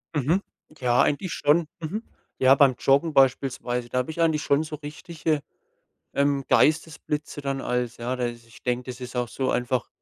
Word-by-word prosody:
Mhm. 150 +7 +2 0.4
Ja, 125 -1 +3
eigentlich 165 +5 0
schon. 155 +3 +2
Mhm. 175 +8 -4 0.4
Ja, 130 +1 +6
beim 135 -2 +5
Joggen 140 +4 +3
beispielsweise, 125 -2 +1
da 125 - 0
habe 125 +5 -2
ich 165 - -3
eigentlich 160 -3 +2
schon 140 +2 +2
so 155 -1 -6
richtige, 155 +1 -3 0.7
ähm, 140 -1 +1
Geistesblitze 150 -2 +1
dann 135 -1 -2
als, 125 -2 -2
ja 120 +2 -3
dass 120 -2 -3
ich 115 0 -18
denke, 125 +1 -2
das 125 +1 -9
ist 125 0 -7
auch 125 -1 0
so 130 +3 -1
einfach, 125 0 -1
135 Hz, 175 wpm, -25 LUFS, 125-150 Hz, 0.7 s, Ja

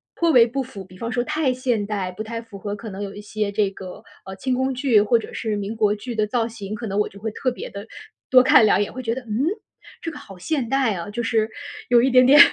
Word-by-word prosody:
颇 335 -1 +2
为 240 -4 +7
不 270 +3 -2
符， 200 -7 -10
比 185 0 -16
方 230 +4 -4
说 245 -1 0
太 305 -2 +1
现 250 -5 -1
代， 195 -3 -3
不 215 - -5
太 230 +1 -5
符 225 -3 -12
合。 205 +1 -5
可 220 +1 -8
能 195 +1 -6
有 195 - -6
一 - - -9
些 210 0 -3
这 205 -1 +1
个， 185 -2 -9 0.2
呃， 190 - -7
清 255 +5 -1
宫 260 +1 0
剧 250 -5 +3
或 230 +3 +3
者 - - -9
是 215 -3 -2
民 205 +2 -4
国 210 -2 +2
剧 230 +3 -6
的 215 - +2
造 225 +2 0
型， 215 -3 -7
可 220 +1 -5
能 195 - -3
我 210 - +1
就 200 - -14
会 220 +2 -3
特 255 +3 -1
别 - - -7
地 200 +1 -8 0.4
多 255 -1 +8
看 245 -3 +6
两 205 - +4
眼， 205 - -3
会 255 0 -6
觉 230 0 0
得： 260 - -5
“嗯？ 220 +5 -1 0.6
这 330 - -3
个 295 - -10
好 195 -8 -12
现 255 - -2
代 265 -5 +2
啊， 170 +3 -5
就 240 +3 -3
是 225 -1 +1 0.4
有 240 -1 +6
一 265 - +3
点 255 0 +6
点 280 +3 +7
225 Hz, 295 characters per minute, -22 LUFS, 205-255 Hz, 0.6 s, 多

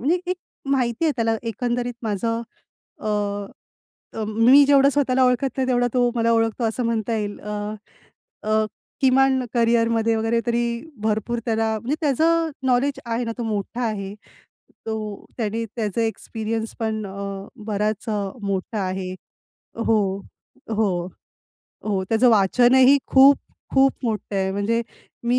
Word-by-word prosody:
म्हणजे 310 +8 +2
एक 360 0 -10
एक 365 - 0 0.3
माहिती 250 +1 +1
आहे 310 - +3
त्याला 225 -1 +1
एकंदरीत 240 +2 -2
माझं 230 +2 -1 0.6
अ, - - -6 1.1
अ, 220 - -3
मी 230 +6 +6
जेवढं 280 0 +5
स्वतःला 265 -2 +2
ओळखत 250 +2 +2
नाही 260 -1 0
तेवढा 245 -1 +2
तो 245 -1 +3
मला 230 0 +2
ओळखतो 225 +1 +1
असं 225 +2 0
म्हणता 230 -1 0
येईल. 205 -1 -4
अ, 210 0 -4 0.7
अ, 215 0 +2 0.4
किमान 265 -1 +4
करियरमध्ये 230 -1 +2
वगैरे 225 +1 +1
तरी 235 0 +1 0.4
भरपूर 220 +2 0
त्याला 225 -1 +1
म्हणजे 255 +6 -1
त्याचं 325 +3 +2 0.2
नॉलेज 260 +2 +2
आहे 235 +1 -2
ना, 230 - -3
तो - - -2
मोठा 220 +2 -3
आहे. 200 -3 -3 0.7
तो 215 -2 -4
त्याने 225 0 -2
त्याचा 220 -1 -1
एक्सपिरियन्स 225 0 -3
पण 220 -1 -1
अ, 195 0 -6 0.2
बराच 210 0 -1
अ, 210 -2 0 0.2
मोठा 200 +2 -2
आहे. 185 0 -3 0.7
हो. 220 -1 +4 0.7
हो. 200 -6 0 0.8
हो. 200 -3 0
त्याचं 230 +3 +4
वाचनही 250 +6 +5
खूप, 275 +1 +7 0.4
खूप 270 0 +5
मोठं 215 -3 -2
आहे. 190 0 0
म्हणजे 215 +4 0 0.4
मी 245 +1 +2
230 Hz, 140 wpm, -23 LUFS, 215-250 Hz, 1.1 s, खूप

